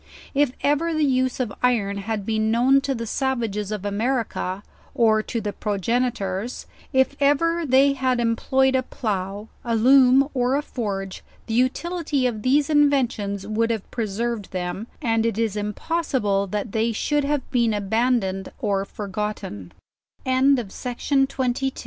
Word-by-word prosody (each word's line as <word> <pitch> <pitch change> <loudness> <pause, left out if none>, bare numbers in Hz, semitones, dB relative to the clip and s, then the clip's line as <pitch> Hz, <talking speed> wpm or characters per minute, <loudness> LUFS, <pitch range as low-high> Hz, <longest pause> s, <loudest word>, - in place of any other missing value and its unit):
If 280 -2 +2
ever 310 +3 +1
the 310 -1 +2
use 260 -1 +1
of 235 -6 -2
iron 215 -5 +1
had 205 0 -3
been 220 0 0
known 255 +4 +4
to 270 -1 -1
the 230 -1 -4
savages 225 -5 -2
of 210 -2 -4
America, 205 -3 -2 0.3
or 220 -2 +4
to 230 - -3
the 210 -2 -4
progenitors, 210 0 -2 0.3
if 265 0 +2
ever 330 +4 +2
they 270 +2 +5
had 260 -2 0
employed 260 +3 +2
a 260 - +3
plough, 205 -4 -4 0.2
a 235 -1 0
loom, 260 +3 +6
or 250 0 +1
a 290 - 0
forge, 195 -8 -4 0.2
the 225 - -4
utility 280 +3 0
of 225 -4 -1
these 280 +5 +3
inventions 255 -10 +1
would 220 +2 0
have 225 -4 -3
preserved 225 -1 -3
them, 185 +4 -4 0.2
and 225 -2 +2
it 230 -2 -1
is 225 -3 0
impossible 210 - -1
that 205 +2 -3
they 225 +2 +1
should 295 +6 0
have 285 -1 0
235 Hz, 130 wpm, -23 LUFS, 210-265 Hz, 0.3 s, loom